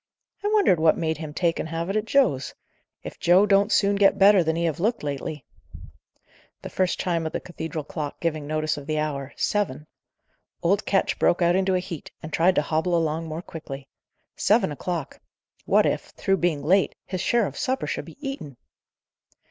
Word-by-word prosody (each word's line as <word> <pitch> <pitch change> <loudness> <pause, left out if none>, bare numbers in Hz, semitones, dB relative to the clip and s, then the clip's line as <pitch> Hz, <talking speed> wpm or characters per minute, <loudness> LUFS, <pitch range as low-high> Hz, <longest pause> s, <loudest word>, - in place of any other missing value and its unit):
I - - 0
wonder 420 - +4
what 160 -2 +3
made 160 -2 -1
him 155 -2 -6
take 170 +2 0
and 160 - -3
have 165 +1 -3
it 195 - -2
at 215 0 0
Joe's? 225 - +1 0.5
If - - -8
Joe 180 +4 +5
don't 200 +1 +3
soon 200 0 +3
get 200 -1 +4
better 195 -2 +6
than 160 0 0
he 170 - -1
have 165 -3 -1
looked 225 +3 0
lately 145 -1 -4 0.6
" - - -34
The - - -7
first 185 -2 0
chime 170 -3 -1
of - - -6
the - - -1
cathedral 160 -3 -6
clock 150 0 -5
giving 155 -3 -2
notice 155 0 -1
of 145 -1 -9
the 155 -1 -1
hour, 140 -3 -3
seven! 195 -9 -1 0.8
Old 195 +4 +1
Ketch 195 - +1
broke 175 - +3
out 170 +1 +3
into 190 0 +2
a - - +2
heat, 180 -4 -7
and 155 -1 -8
tried 180 +3 +3
to - - +2
hobble 160 +4 0
along 165 0 -1
more 160 +2 -5
quickly. 140 -5 -8 0.5
Seven 215 -6 +2
o'clock! 165 0 -4 0.5
What - - +4
if, - - 0
through 195 0 +1
being 165 -5 0
late, 190 +5 +2
his 185 -2 -4
share 235 -2 +2
of - - -6
supper 260 +1 -1
should - - -3
be - - -13
eaten! 150 - -6
170 Hz, 195 wpm, -25 LUFS, 155-195 Hz, 0.8 s, better